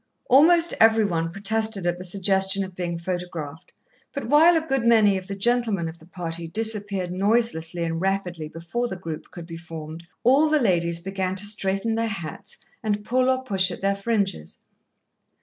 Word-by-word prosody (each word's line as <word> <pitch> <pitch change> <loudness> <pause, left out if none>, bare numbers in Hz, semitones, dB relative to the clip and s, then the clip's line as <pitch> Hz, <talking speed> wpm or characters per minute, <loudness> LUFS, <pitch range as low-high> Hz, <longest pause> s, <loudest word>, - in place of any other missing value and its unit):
Almost 330 +5 +6
every 225 -1 +5
one 165 -3 -1
protested 210 0 +1
at 175 0 -1
the - - -6
suggestion 190 +1 +1
of 190 -1 -9
being 175 -2 -3
photographed, 170 -3 -6 0.4
but 280 - -4
while 315 +7 +6
a - - +1
good 270 -5 0
many 220 -4 +5
of 190 -1 -5
the 200 - -5
gentlemen 220 -4 +1
of 165 +1 -8
the 160 - -17
party 170 -2 -5
disappeared 205 -2 -2
noiselessly 185 -4 0
and 165 0 -2
rapidly 185 -4 -2
before 170 +10 -4
the 190 - -5
group 165 -4 -7
could 170 -2 -10
be 165 -1 -8
formed, 165 0 -9 0.2
all 275 +6 +4
the 305 0 +3
ladies 170 -7 +1
began 190 +1 -3
to 190 - 0
straighten 205 +1 -1
their 225 0 0
hats, 195 -1 -7 0.2
and 210 -1 -1
pull 255 +2 +2
or 260 0 +1
push 195 -6 +2
at 175 - -7
their 195 0 +2
fringes. 200 - -2
195 Hz, 180 wpm, -24 LUFS, 170-225 Hz, 0.4 s, Almost